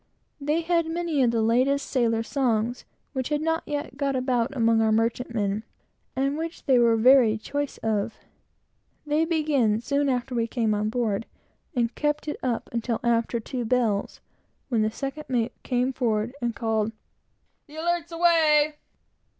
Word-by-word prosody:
They 300 +3 0
had 335 0 +1
many 330 -3 -1
of 245 - +4
the 230 -1 +1
latest 255 +5 +2
sailor 230 -3 +1
songs, 240 -2 -1 0.3
which 260 -1 -2
had 300 -1 +1
not 325 0 +1
yet 290 -2 -4
got 280 -1 0
about 255 -1 0
among 230 -1 +3
our 220 0 +3
merchantmen, 225 -2 0 0.5
and 275 +3 0
which 330 +1 -6
they 260 -3 +4
were 235 -1 +4
very 240 -2 +6
choice 285 +5 -4
of. 220 0 -1 0.9
They 300 +2 +2
began 295 -10 +1
soon 280 +4 0
after 250 0 -1
we 230 -1 0
came 225 -3 0
on 210 +1 0
board, 225 -2 -1 0.5
and 235 -1 +1
kept 295 0 -1
it 300 - -3
up 245 -3 -2
until 235 0 -2
after 235 0 +1
two 245 +2 -4
bells, 225 -4 0 0.5
when 230 -4 +1
the 215 - +2
second 275 +6 -5
mate 240 -2 0
came 250 +1 0
forward 230 -2 0
and 235 -1 -1
called 220 -1 -1 0.7
"the 300 - -14
Alerts 340 +1 -1
away!" 315 -3 +3
250 Hz, 160 wpm, -25 LUFS, 225-295 Hz, 0.9 s, very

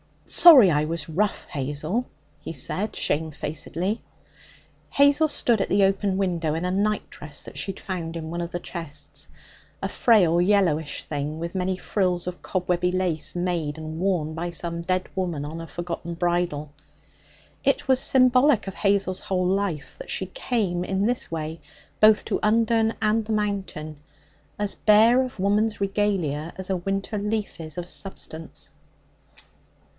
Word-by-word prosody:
'Sorry 270 - +8
I 150 0 +2
was 160 -1 -4
rough, 195 +6 0
Hazel,' 150 - -2 0.3
he - - -7
said 190 +8 -2
shamefacedly. 160 +6 -2 0.9
Hazel 285 +3 +4
stood 240 -6 +1
at - - 0
the 200 - +4
open 195 0 +1
window 175 -5 0
in 165 - -2
a 180 - 0
nightdress 195 -7 -2
that - - -8
she 195 - -2
had - - -13
found 170 -3 -4
in 160 -1 -5
one 170 - -3
of 170 - -3
the 175 - -4
chests 165 -5 -6 0.5
a - - -2
frail, 180 -8 +4
yellowish 175 -6 +2
thing 150 +1 -4
with 170 +1 -5
many 185 0 -1
frills 180 -2 0
of 180 -1 -5
cobwebby 180 -1 0
lace 180 -4 -1
made 175 -4 -1
and 155 0 -6
worn 175 -5 0
by 170 +2 -3
some 170 0 -3
dead 185 +1 -1
woman 175 -6 -2
on 160 +3 -6
a 165 - -8
forgotten 170 0 -5
bridal. 170 -4 -1 0.9
It - - +1
was 260 -1 +5
symbolic 255 0 +4
of 195 - -4
Hazel's 195 -2 +1
whole 185 -1 -1
life 185 -5 -1
that - - -9
she - - -1
came 210 - -1
in 195 +1 0
this 245 +2 0
way 160 0 -4 0.4
both 215 0 +6
to - - -1
Undern 225 +1 +2
and 215 0 +2
the 220 - -2
Mountain 195 -8 -3 0.6
as 205 -1 0
bare 225 +4 +5
of 255 -5 -5
woman's 210 +3 +1
regalia 190 -6 0
as 190 0 -5
a 190 - +1
winter 195 +3 -2
leaf 210 -1 -2
is 160 +1 -7
of 175 0 -4
substance. 165 -4 -6
185 Hz, 155 wpm, -25 LUFS, 165-210 Hz, 0.9 s, Sorry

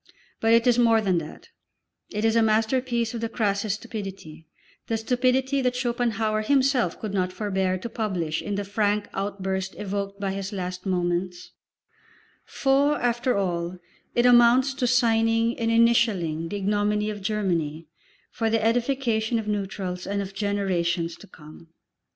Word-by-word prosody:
But 225 0 +3
it 230 +1 +4
is 245 -1 +4
more 230 -2 +5
than 190 -5 +1
that, 155 - -10 0.6
it 210 +1 -2
is 225 0 +2
a 230 - +5
masterpiece 230 +2 +1
of 230 - -4
the 230 - -2
crassest 205 -2 0
stupidity 195 -8 -8 0.4
the 225 - 0
stupidity 255 +4 +1
that 250 -1 0
Schopenhauer 235 -3 0
himself 260 -5 +2
could 215 -3 -5
not 185 -2 0
forbear 190 -2 -1
to 185 - -6
publish 185 -9 -2
in 205 - -3
the 200 - -2
frank 205 +1 0
outburst 190 -1 -3
evoked 200 0 -4
by 195 -1 -2
his 195 0 -4
last 185 -1 -5
moments; 180 -1 -2 0.9
for 280 +2 +2
after 240 0 0
all 175 -2 -2 0.4
it 240 - +3
amounts 245 +2 +5
to 265 -2 -1
signing 230 -1 +2
and 230 -1 0
initialling 215 -9 +2
the 205 - -4
ignominy 210 +1 0
of 205 -1 -7
Germany 170 -7 -1 0.5
for 225 -2 -1
the 220 -1 +1
edification 235 -1 +1
of 220 -2 -4
neutrals 195 -3 -3
and 200 0 -1
of 195 -1 -5
generations 185 -4 -1
to - - -14
come. 155 -1 -14
210 Hz, 150 wpm, -25 LUFS, 190-235 Hz, 0.9 s, more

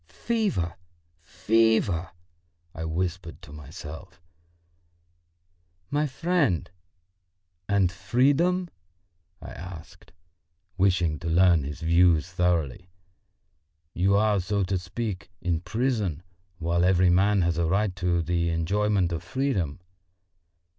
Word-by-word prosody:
"Fever, 205 - -2 0.4
fever!" 105 -2 +1 0.6
I 80 -2 -5
whispered 85 0 -3
to 70 - -12
myself. 75 +5 -10 1.7
"My 150 +1 +1
friend, 140 - 0 1.0
and 100 -3 +3
freedom?" 145 - +1 0.7
I - - -8
asked, 85 -1 -11 0.6
wishing 90 -5 +1
to 80 - -4
learn 85 -2 +4
his 75 0 -6
views 85 0 +3
thoroughly. 90 -2 -1 1.0
"You 95 +3 +2
are, 105 -1 +3
so 100 +2 -1
to 95 0 -1
speak, 90 +1 -5
in 85 -2 -1
prison, 105 - -2 0.3
while 85 +1 0
every 90 -1 +4
man 100 +1 +3
has 85 0 0
a 85 - +1
right 100 +2 0
to 85 -1 0
the 85 0 0
enjoyment 95 +3 +1
of 85 -1 -3
freedom." 90 - -2
90 Hz, 105 wpm, -26 LUFS, 85-105 Hz, 1.7 s, learn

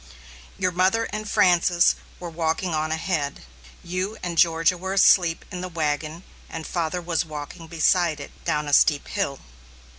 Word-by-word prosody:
Your 185 -1 0
mother 185 +6 +2
and 215 0 -4
Frances 175 -1 +4 0.3
were 180 - -6
walking 165 +2 -1
on 155 0 -1
ahead; 160 -3 -2 0.4
you 185 +5 -3
and 175 -1 -3
Georgia 165 +1 +3
were 190 +2 -4
asleep 175 -4 +4
in 180 - -5
the 185 - -5
wagon; 155 +1 -2 0.3
and 160 -1 -6
father 170 0 -2
was 170 -1 0
walking 155 +2 -8
beside 165 -1 +2
it, 140 - -9
down 150 0 -1
a 145 - -3
steep 145 +1 +4
hill. 155 -10 -2
170 Hz, 155 wpm, -24 LUFS, 155-180 Hz, 0.4 s, Frances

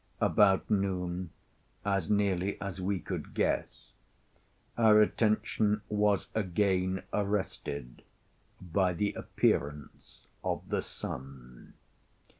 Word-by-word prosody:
About 95 -2 +4
noon, 90 -3 -1 0.6
as 100 -2 0
nearly 100 -2 +1
as 100 -2 -5
we 95 +1 0
could - - -6
guess, - - -1 0.8
our 110 -2 +6
attention 105 -1 +2
was 105 -2 +2
again 95 -2 +1
arrested 95 -11 -2 0.6
by 90 +1 +1
the 100 +4 -1
appearance 70 0 -2 0.2
of - - -2
the - - 0
sun. 65 -2 -8
95 Hz, 90 wpm, -31 LUFS, 90-105 Hz, 0.8 s, our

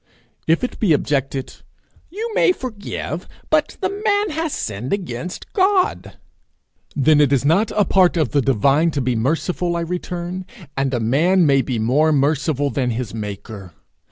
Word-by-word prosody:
If 165 +6 +2
it 250 - -3
be 195 -8 +3
objected, 135 -2 -1 0.5
'You 440 +7 -5
may 370 - +4
forgive, 205 - -6 0.2
but 305 -1 +1
the 395 +2 -2
man 410 -2 +2
has 320 0 -2
sinned 110 - -4
against 180 - -5
God!' 380 -1 +1 0.8
Then 150 +1 +4
it 145 -2 +3
is 140 -1 +2
not 190 +9 +3
a 210 - +3
part 185 -2 +3
of 155 -7 +1
the 145 - +2
divine 135 +6 +3
to - - +3
be 125 -1 0
merciful, 165 +8 -1
I 170 - -1
return, 180 +1 -4 0.3
and 135 -1 0
a - - 0
man 160 +11 +3
may 135 -2 +4
be 130 -2 -3
more 135 +8 +2
merciful 145 0 +1
than 130 -3 -1
his 120 -2 -3
maker! 105 -3 -7
155 Hz, 160 wpm, -20 LUFS, 130-190 Hz, 0.8 s, may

